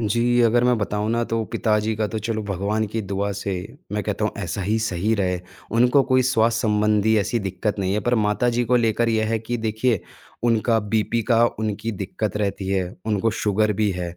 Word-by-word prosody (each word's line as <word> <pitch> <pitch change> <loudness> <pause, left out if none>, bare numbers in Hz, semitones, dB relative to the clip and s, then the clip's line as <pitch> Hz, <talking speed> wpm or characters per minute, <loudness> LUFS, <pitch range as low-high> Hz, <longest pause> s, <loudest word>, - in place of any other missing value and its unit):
जी, 120 +3 +2
अगर 120 +1 +3
मैं 125 0 +3
बताऊँ 105 +1 -1
ना 120 +1 +1
तो 115 0 0
पिताजी 110 0 +1
का 110 0 0
तो 110 - -3
चलो 110 -2 -2
भगवान 100 +4 -1
की 115 - -1
दुआ 100 +1 -2
से, 100 0 -4 0.4
मैं 105 0 -1
कहता 105 +1 -2
हूँ 105 - 0
ऐसा 90 +3 -3
ही 110 +4 +1
सही 110 0 0
रहे, 90 -3 0 0.3
उनको 125 +5 +4
कोई 130 - +5
स्वास्थ्य 115 -2 +2
संबंधी 105 +1 +3
ऐसी 110 +4 0
दिक्कत 100 +3 -2
नहीं 95 -1 0
है, 105 - 0
पर 120 +4 +1
माताजी 120 +3 +1
को 125 +2 +3
लेकर 115 0 +2
ये 110 -1 +1
है 115 - +1
कि 115 +2 -3
देखिए 110 -1 +1 0.4
उनका 115 -1 +2 0.2
बीपी 115 +2 +1
का 115 +1 +5
उनकी 110 +1 -2
दिक्कत 100 +1 -3
रहती 100 -2 -2
है, 95 -2 -1
उनको 110 +1 +1
शुगर 105 +1 +2
भी 105 - +2
है 90 -1 -5
110 Hz, 205 wpm, -23 LUFS, 100-115 Hz, 0.4 s, कोई